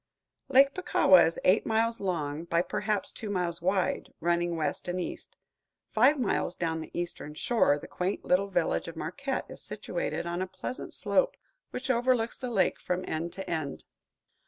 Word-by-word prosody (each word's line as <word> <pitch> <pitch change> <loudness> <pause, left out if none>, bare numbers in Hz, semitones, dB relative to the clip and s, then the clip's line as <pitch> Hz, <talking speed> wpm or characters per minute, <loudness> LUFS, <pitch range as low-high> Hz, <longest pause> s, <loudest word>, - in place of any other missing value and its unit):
Lake 275 +1 +6
Puckawa 190 - +5
is 165 - -3
eight 185 +4 +5
miles 225 +1 +1
long 160 -4 -2
by 170 0 +2
perhaps 210 +1 -1
two 215 - -7
miles 175 -4 -1
wide, 185 +1 0
running 175 0 +1
west 160 +2 -2
and 180 +1 -1
east. 175 - -6 0.5
Five 265 +6 +5
miles 200 -6 0
down 160 -1 -1
the - - -8
eastern 170 -3 -5
shore, 185 -6 +3
the - - -9
quaint 185 +3 -2
little 190 +2 +3
village 175 -4 0
of 165 - -7
Marquette 260 - -3
is - - -9
situated - - -3
on 175 +1 -2
a 185 - -1
pleasant 190 +7 -6
slope - - +1 0.3
which 260 +1 -2
overlooks 240 -1 +1
the 250 - -3
lake 210 -5 +2
from 180 0 -2
end 165 +2 -2
to 190 - -6
end. 155 -5 -3
185 Hz, 170 wpm, -29 LUFS, 170-230 Hz, 0.5 s, Lake